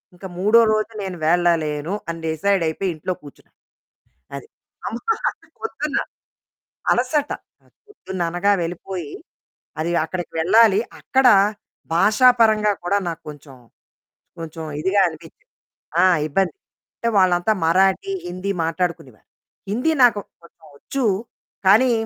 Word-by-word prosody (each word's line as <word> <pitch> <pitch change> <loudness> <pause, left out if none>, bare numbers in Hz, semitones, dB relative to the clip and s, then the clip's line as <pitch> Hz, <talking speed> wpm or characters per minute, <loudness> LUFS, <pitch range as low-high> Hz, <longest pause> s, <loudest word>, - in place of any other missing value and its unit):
ఇంక 180 - -12
మూడో 215 +4 +5
రోజు 215 +1 -1
నేను 185 -2 -5
వెళ్ళలేను 165 -2 +1 0.2
అని 165 0 -4
డిసైడయిపోయి 165 +2 0
ఇంట్లో 180 +4 -3
కూర్చున్నాను. 145 - -16 0.8
అది. - - -9 0.4
అమ్మా! 245 - -1 0.2
అది - - -21
పొద్దున్న 300 -10 -3 0.9
అలసట 275 +4 0 0.6
పొద్దున్ననగా 190 - -1
వెళ్ళిపోయి. 175 -2 -5 0.7
అది 170 - -1
అక్కడికి 175 +1 -5
వెళ్ళాలి, 210 +4 +5 0.2
అక్కడ 265 -2 +2 0.7
భాషా 210 +8 +5
పరంగా 215 -2 +4
కూడా 200 +3 +2
నాకు 165 -1 -6
కొంచెం, 145 -2 -11 0.9
కొంచెం 165 0 -7 0.2
ఇదిగా 195 +3 +2
అనిపించింది. 160 - -15 0.6
ఆ! - - +6 0.2
ఇబ్బంది. 190 - 0 0.4
అంటే 230 - -1
వాళ్ళంతా 185 +2 +3
మరాఠీ, 190 - +2 0.2
హిందీ 185 +3 -3
మాట్లాడుకునేవారు. 165 - -3 0.4
హిందీ 250 +10 +1
నాకు 230 -4 +5 0.2
కొంచెం 165 -1 -20
వొచ్చు 270 - -4 0.6
కానీ, 240 +6 +6
185 Hz, 110 wpm, -21 LUFS, 165-215 Hz, 0.9 s, ఆ